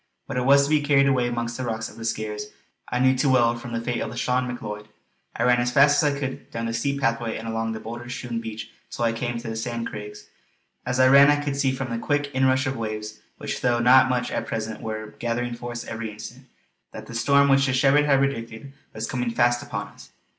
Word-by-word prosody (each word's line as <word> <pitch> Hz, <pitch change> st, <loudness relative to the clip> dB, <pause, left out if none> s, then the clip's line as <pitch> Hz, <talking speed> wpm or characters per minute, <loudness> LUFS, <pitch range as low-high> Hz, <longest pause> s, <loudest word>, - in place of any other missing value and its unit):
What 135 Hz, -, -6 dB
it 125 Hz, -, -1 dB
was 140 Hz, +1 st, +6 dB
to 140 Hz, -, -1 dB
be 155 Hz, -1 st, +4 dB
carried 145 Hz, -1 st, +4 dB
away 130 Hz, -3 st, +2 dB
amongst 120 Hz, -1 st, -3 dB
the 130 Hz, -, -4 dB
rocks 110 Hz, -1 st, -3 dB
of -, -, -14 dB
the -, -, -10 dB
Skares 105 Hz, -2 st, -3 dB, 0.5 s
I 125 Hz, -, 0 dB
knew 130 Hz, +1 st, +4 dB
too 135 Hz, +2 st, +1 dB
well 120 Hz, -2 st, +4 dB
from 120 Hz, 0 st, -8 dB
the 115 Hz, -, -2 dB
fate 120 Hz, +1 st, -2 dB
of -, -, -3 dB
Lauchlane 125 Hz, 0 st, -1 dB
Macleod. 105 Hz, -4 st, -6 dB, 0.5 s
I 115 Hz, -, 0 dB
ran 125 Hz, 0 st, +4 dB
as 120 Hz, 0 st, +1 dB
fast 145 Hz, +3 st, +5 dB
as 145 Hz, -2 st, +1 dB
I -, -, -6 dB
could 135 Hz, -2 st, -5 dB
down 115 Hz, 0 st, -4 dB
the 115 Hz, -, -2 dB
steep 140 Hz, +5 st, -1 dB
pathway 115 Hz, -3 st, -1 dB
and 115 Hz, -, -7 dB
along 115 Hz, 0 st, -2 dB
the 110 Hz, -, -5 dB
boulder 120 Hz, +2 st, -8 dB
strewn 120 Hz, -1 st, -4 dB
beach 110 Hz, -1 st, -7 dB, 0.2 s
till 120 Hz, -, -2 dB
I 115 Hz, -, +1 dB
came 120 Hz, +1 st, -3 dB
to 115 Hz, 0 st, -7 dB
the 110 Hz, -, -4 dB
Sand 115 Hz, 0 st, -3 dB
Craigs. 105 Hz, 0 st, -8 dB, 0.6 s
As 125 Hz, 0 st, -1 dB
I 130 Hz, -, +6 dB
ran 140 Hz, +2 st, +8 dB
I 145 Hz, 0 st, +3 dB
could 145 Hz, -1 st, -2 dB
see 140 Hz, -1 st, +1 dB
from 130 Hz, -1 st, -4 dB
the 115 Hz, -, -2 dB
quick 145 Hz, +2 st, -1 dB
inrush 130 Hz, +1 st, +2 dB
of 135 Hz, 0 st, -2 dB
waves, 110 Hz, -1 st, -5 dB, 0.2 s
which -, -, -5 dB
though 120 Hz, -1 st, +2 dB
not 130 Hz, +2 st, +6 dB
much 125 Hz, -1 st, -1 dB
at -, -, -3 dB
present 110 Hz, 0 st, -4 dB
were 110 Hz, -1 st, -5 dB
gathering 120 Hz, +1 st, -2 dB
force 120 Hz, 0 st, -6 dB
every 110 Hz, 0 st, -5 dB
instant, 115 Hz, +5 st, -10 dB, 0.5 s
that -, -, -8 dB
the -, -, -10 dB
storm 140 Hz, +4 st, +4 dB
which 135 Hz, 0 st, +4 dB
the 130 Hz, -, 0 dB
shepherd 140 Hz, +3 st, +4 dB
had 140 Hz, -2 st, +4 dB
predicted 135 Hz, -1 st, -3 dB, 0.2 s
was 110 Hz, +1 st, -3 dB
coming 125 Hz, -2 st, -2 dB
fast 120 Hz, +1 st, +2 dB
upon -, -, -5 dB
us. -, -, -16 dB
120 Hz, 245 wpm, -24 LUFS, 115-135 Hz, 0.6 s, ran